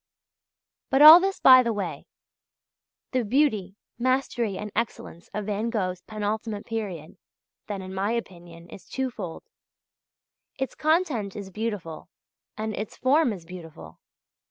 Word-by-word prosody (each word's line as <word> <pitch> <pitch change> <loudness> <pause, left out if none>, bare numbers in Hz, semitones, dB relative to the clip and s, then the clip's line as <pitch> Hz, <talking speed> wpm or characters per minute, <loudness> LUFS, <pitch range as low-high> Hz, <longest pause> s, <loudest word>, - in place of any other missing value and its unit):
But 270 +2 +4
all 315 +3 +12
this 390 +1 -2
by 255 -1 +8
the 235 -2 -1
way. 205 -3 -5 1.0
The 255 -2 0
beauty, 215 -6 +1 0.2
mastery, 245 -5 0
and 210 +1 -6
excellence 215 -6 -4
of 210 -1 -4
Van 210 +2 -2
Gogh's 185 -5 -2
penultimate 215 0 -4
period, 195 -9 -6 0.5
then, 200 -2 -5
in 185 0 -8
my 195 +2 -1
opinion, 175 -6 -7
is - - -13
twofold. 235 -10 -5 1.1
Its 265 -1 -3
content 305 - 0
is 200 -2 -7
beautiful 205 -7 -5 0.5
and 215 0 -3
its 210 0 -6
form 275 0 +3
is 180 -5 -8
beautiful. 160 - -11
210 Hz, 130 wpm, -25 LUFS, 190-250 Hz, 1.1 s, all